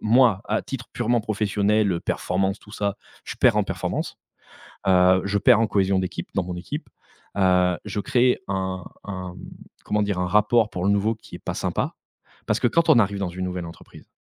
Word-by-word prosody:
moi 115 -3 +4
à 110 - 0
titre 125 -3 -6
purement 120 0 +1
professionnel, 105 -1 +1
heu, 85 - -2
performance 95 +1 -1
tout 105 - -16
ça, 100 -1 -2 0.3
je - - -6
perds - - +4
en - - +2
performance. - - -3 0.7
Heu, 95 0 +5
je 100 +1 +1
perds 115 +2 +5
en 115 - +2
cohésion 95 -2 +2
d'équipe, 90 -2 -4
dans 95 - +1
mon 90 0 -5
équipe. 90 -2 -6 0.5
Heu, 90 -2 +3
je 105 0 -3
crée 125 +5 +2
un 95 -1 -2 0.2
un 95 -3 -6
mmh, - - -12 0.5
comment 105 0 +1
dire? 100 -3 -1
Un 90 - 0
rapport 105 +3 +3
pour 90 +1 -3
le 100 - +4
nouveau 105 +3 +1
qui 110 - -13
est - - -9
pas - - -5
sympa. - - -2 0.5
Parce - - +1
que - - +3
quand 165 +5 +2
on 135 -7 +7
arrive 100 -1 +1
dans 95 -3 -2
une 90 +1 -4
nouvelle 90 -1 -4
entreprise, 85 - -13
100 Hz, 200 wpm, -24 LUFS, 95-110 Hz, 0.7 s, on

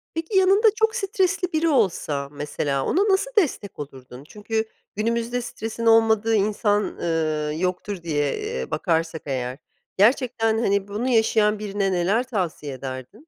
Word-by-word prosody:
Peki, 330 +5 -1
yanında 390 +4 +5
çok 445 0 +1
stresli 385 -4 0
biri 320 +1 +2
olsa 165 - 0
mesela 145 -1 -2
ona 380 - +2
nasıl 390 +6 +2
destek 255 - 0
olurdun? 130 -2 -9
Çünkü 220 +1 -3 0.3
günümüzde 235 +3 -1
stresin 230 -1 -5
olmadığı 225 -1 +4
insan, 205 0 +1
ııı, 155 -2 -2
yoktur 180 +1 -3
diye, 145 -3 0
eee, 65 - -4
bakarsak 165 0 -1
eğer, 130 -1 -3 0.4
gerçekten, 225 0 +3
hani, 200 -3 +1
bunu 215 +5 -3
yaşayan 220 -2 +3
birine 200 -2 -1
neler 190 +7 +1
tavsiye 175 - -3
ederdin? 130 - -8
210 Hz, 135 wpm, -23 LUFS, 160-235 Hz, 0.4 s, yanında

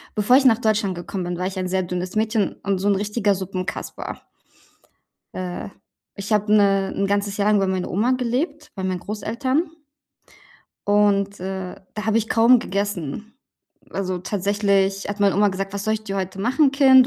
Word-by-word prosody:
Bevor 215 +4 +4
ich 275 - +6
nach 235 -4 +6
Deutschland 210 -4 +1
gekommen 180 +2 -5
bin, 175 0 -3
war 180 - -1
ich 190 0 -6
ein 185 -1 -2
sehr 185 0 +1
dünnes 180 +2 -4
Mädchen 215 -2 +1
und 195 -1 0
so 200 +2 +1
'n 200 - +4
richtiger 205 0 +1
Suppenkasper. 185 -1 -5 1.1
Äh, 180 0 -5 0.5
ich 200 +2 -5
habe 210 0 +2
'ne 195 -2 +3
'n 200 - 0
ganzes 200 0 0
Jahr 205 0 +1
lang 210 - +4
bei 195 - +2
meiner 190 -1 -2
Oma 225 +7 +2
gelebt, 280 +5 -2
bei 190 -2 -5
meinen 185 -1 -1
Großeltern. 235 - -1 1.2
Und, 200 -1 +2
äh, 190 -1 -4 0.2
da 215 +1 -4
habe 220 - +2
ich 225 -1 +1
kaum 235 +2 +5
gegessen. 200 - -3 0.6
Also, 185 -2 -2
tatsächlich 200 0 0
hat 205 0 -4
meine 200 -3 +3
Oma 205 +1 +4
gesagt: 195 0 -4
„Was 200 0 -3
soll 215 - +1
ich 215 0 -6
dir 195 -2 -4
heute 190 0 -3
machen, 265 +6 +3
Kind?“ 265 -2 +7
200 Hz, 185 wpm, -22 LUFS, 190-220 Hz, 1.2 s, Kind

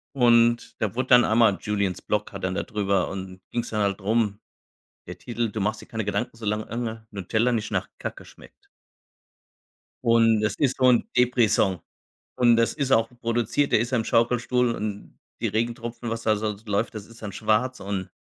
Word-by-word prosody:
und 120 -2 +3
da 105 -3 0
wurde 130 +2 -2
dann 125 -1 +7
einmal 110 -3 +4
JuliensBlog 105 0 -2
hat 95 - -7
dann 95 0 -1
da - - -2
drüber 100 -5 0
und 95 -1 -7
ging's 120 -1 -3
dann 110 -1 -1
halt 100 0 0
drum, 105 0 0 0.7
der - - -8
Titel: 120 -2 -3
„Du 105 0 -4
machst 105 +2 -1
dir - - -13
keine 110 -1 -4
Gedanken, 115 +3 -2
solang 105 -1 -2
ange 115 -1 -5
Nutella 110 +5 0
nicht 110 -2 -2
nach - - -1
Kacke - - -6
schmeckt“ 405 - -18 1.4
und 115 -2 +4
das 110 -2 0
ist 135 -3 +1
so 130 - +4
'n 120 -2 +3
Depri-Song 110 -7 +3 0.6
und 120 -2 +5
das 115 -1 +2
ist 140 -3 -1
auch 115 -3 +4
produziert 120 +4 0
der - - +5
ist 120 +2 -2
im 115 -3 +1
Schaukelstuhl 120 +1 +2
und 105 -1 -6 0.2
die - - 0
Regentropfen, 115 +1 -3
was 115 0 -3
da 110 - +2
s 105 - -4
so 105 -1 -1
läuft, 100 +1 -1
das 105 -2 -7
ist 115 0 -16
dann 105 -2 -5
schwarz 110 +6 0
und 95 -1 -4
115 Hz, 185 wpm, -25 LUFS, 105-120 Hz, 1.4 s, dann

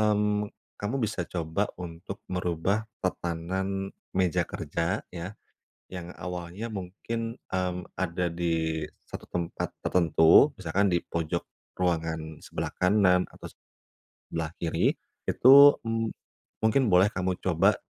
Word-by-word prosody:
mmm, 105 -1 +2 0.3
kamu 105 +6 -1
bisa 105 -4 -2
coba 85 +3 -1
untuk 90 +2 -7
merubah 90 +4 0 0.2
tatanan 95 +3 -2 0.2
meja 90 -3 +2
kerja 85 +2 -2
ya, 90 +4 -6 0.5
yang 90 -1 -7
awalnya 90 +4 -5
mungkin, 115 +4 -5
mmm, 90 -1 -1
ada 90 -1 -1
di 80 -2 -1 0.2
satu - - -7
tempat 85 -1 -3
tertentu, 85 - +5
misalkan 95 +3 +1
di 85 - +3
pojok 85 +1 -2 0.4
ruangan 80 -3 -1
sebelah - - -4
kanan 90 -1 +4
atau - - -10 0.8
sebelah - - -2
kiri - - +1 0.3
itu, 130 - +6 0.3
mmm, 115 -1 -1 0.6
mungkin 120 +2 +3
boleh 95 +2 +5
kamu 95 -1 -1
coba 85 -3 +3
90 Hz, 115 wpm, -28 LUFS, 85-100 Hz, 0.8 s, itu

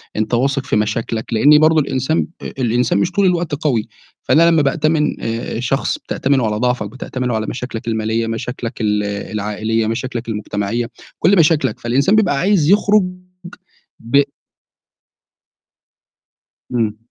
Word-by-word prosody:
أنت 110 +2 -2
واثق 135 +2 +1
في - - -1
مشاكلك، 110 +2 -2
لإن 145 +7 +6
برضه 155 +1 +4
الإنسان 135 +2 0
آآ - - -5
الإنسان 125 +6 +1
مش 170 - 0
طول 200 +1 +2
الوقت 175 -4 +1
قوي، 140 -7 -1 0.4
فأنا 165 +2 +4
لمّا 165 -2 +4
بأتمن 150 +2 0
آآ 115 0 -3
شخص 130 +3 -1
بتأتمنه 135 -2 0
على 105 -1 -1
ضعفك، 125 -2 -1
بتأتمنه 125 +1 -4
على 110 0 -2
مشاكلك 120 -2 -6
المالية، 110 0 -1
مشاكلك 115 +1 -5
ال 105 -1 +1
العائلية، 105 +2 -2
مشاكلك 120 +1 -4
المجتمعية، 105 +2 -2 0.3
كلّ 195 +2 +4
مشاكلك، 155 -8 +2
فالإنسان 135 - +2
بيبقى 195 -9 +2
عايز 180 -4 +2
يخرج 205 +1 +4 1.0
ب 130 +5 +3 2.5
إمم. 110 -3 0
125 Hz, 135 wpm, -18 LUFS, 110-150 Hz, 2.5 s, لإن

